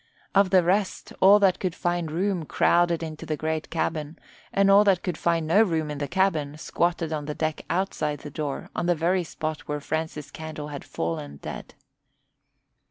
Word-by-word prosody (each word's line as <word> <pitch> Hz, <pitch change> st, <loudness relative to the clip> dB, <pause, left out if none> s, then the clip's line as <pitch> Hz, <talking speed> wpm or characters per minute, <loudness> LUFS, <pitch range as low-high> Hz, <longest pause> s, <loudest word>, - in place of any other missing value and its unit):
Of 200 Hz, -1 st, +4 dB
the 185 Hz, -1 st, +5 dB
rest, 190 Hz, +3 st, 0 dB
all 195 Hz, +2 st, +8 dB
that 190 Hz, -2 st, +4 dB
could 185 Hz, -3 st, -2 dB
find 175 Hz, -2 st, -1 dB
room 180 Hz, +2 st, -1 dB
crowded 170 Hz, +2 st, +2 dB
into 155 Hz, -1 st, -6 dB
the 155 Hz, -, -3 dB
great 160 Hz, 0 st, -2 dB
cabin, 155 Hz, -1 st, -2 dB, 0.3 s
and 195 Hz, 0 st, +4 dB
all 200 Hz, +1 st, +8 dB
that 195 Hz, -3 st, +3 dB
could 180 Hz, -3 st, -2 dB
find 165 Hz, -1 st, 0 dB
no 170 Hz, +7 st, +5 dB
room 160 Hz, -7 st, +1 dB
in 145 Hz, -, -5 dB
the 145 Hz, -, -2 dB
cabin 155 Hz, -4 st, 0 dB
squatted 170 Hz, 0 st, -1 dB
on 150 Hz, -1 st, -3 dB
the 150 Hz, 0 st, -4 dB
deck 155 Hz, -1 st, -2 dB
outside 160 Hz, -5 st, -1 dB
the 150 Hz, -, -8 dB
door 145 Hz, -2 st, -4 dB
on 175 Hz, -, -1 dB
the 175 Hz, -, +3 dB
very 175 Hz, +3 st, +1 dB
spot 155 Hz, -1 st, -5 dB
where 150 Hz, 0 st, -2 dB
Francis 155 Hz, -1 st, -4 dB
Candle 155 Hz, -2 st, -7 dB
had 145 Hz, -2 st, -6 dB
fallen 75 Hz, -3 st, -4 dB
dead. -, -, -8 dB
160 Hz, 185 wpm, -26 LUFS, 150-180 Hz, 0.3 s, all